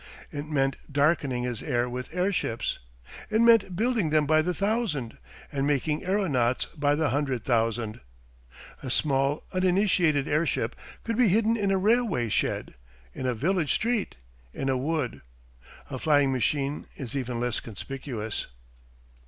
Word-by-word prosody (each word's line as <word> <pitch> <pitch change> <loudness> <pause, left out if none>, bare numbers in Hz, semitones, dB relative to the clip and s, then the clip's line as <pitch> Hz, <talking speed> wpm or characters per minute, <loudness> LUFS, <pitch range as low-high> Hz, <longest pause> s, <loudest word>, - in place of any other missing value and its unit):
It 145 +1 -5
meant 135 -3 +1
darkening 140 -3 +2
his 120 -3 -3
air 125 -4 0
with 125 +2 -5
airships. 180 - -1 0.5
It 220 0 +2
meant 230 -5 +5
building 225 -4 +1
them 155 -1 +3
by 155 +1 +4
the 180 +3 0
thousand 200 - -1 0.3
and 140 -1 0
making 150 +1 0
aeronauts 150 - +1
by 145 -1 +2
the 160 0 +1
hundred 135 -5 -1
thousand. 115 -2 0 0.8
A 130 - -5
small 135 +2 +1
uninitated 180 -5 +2
airship 155 +3 0 0.3
could 230 0 -2
be 245 - +6
hidden 220 +4 +3
in 205 -3 0
a 195 - +3
railway 200 - +2
shed, - - -1 0.4
in 130 - -3
a 125 - 0
village 165 - +1
street, 230 -2 -1 0.4
in 135 - -2
a 135 - +2
wood; 145 -1 -2 0.7
a 130 -2 -5
flying 145 -2 +3
machine 140 +2 -1
is 130 -1 -6
even 125 -3 -2
less 120 -1 -1
conspicuous. 115 -1 -5
145 Hz, 145 wpm, -27 LUFS, 130-185 Hz, 0.8 s, be